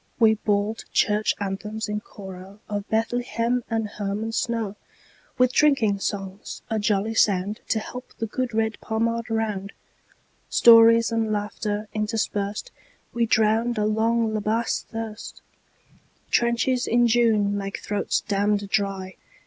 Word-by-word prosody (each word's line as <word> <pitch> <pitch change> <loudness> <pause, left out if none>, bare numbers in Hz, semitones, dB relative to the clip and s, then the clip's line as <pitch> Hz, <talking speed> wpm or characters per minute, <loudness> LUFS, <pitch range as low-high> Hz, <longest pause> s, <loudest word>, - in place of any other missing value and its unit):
We 220 -2 +6
bawled 210 +1 -1
Church 210 0 +2
anthems 210 +2 -4
in 210 0 -3
choroOf 190 -1 -11 0.3
Bethlehem 240 +1 0
and 225 -2 -1
Hermon 205 +2 -3
snow, 225 -3 -2 0.6
With 255 0 +3
drinking 240 -10 +3
songs, 195 0 -5
a 220 - +1
jolly 210 +1 0
soundTo 205 +1 +1
help 250 +3 -6
the 225 - -2
good 250 +3 -3
red 220 -1 -1
Pommard 230 +1 -1
round. 210 -3 -2 0.8
Stories 230 0 +7
and 225 -1 0
laughter 210 0 -3
interspersed, 215 - -2 0.4
We 235 -1 +1
drowned 225 +2 +2
a 210 - +1
long 225 +1 +1
La 215 - 0
Bassée 220 +3 -1
thirst—Trenches 235 +2 -4
in 240 +1 +3
June 220 -4 +3
make 195 -1 -4
throats 205 -1 -1
damned 205 0 0
dry. 195 -2 -2
220 Hz, 120 wpm, -24 LUFS, 205-230 Hz, 0.8 s, Stories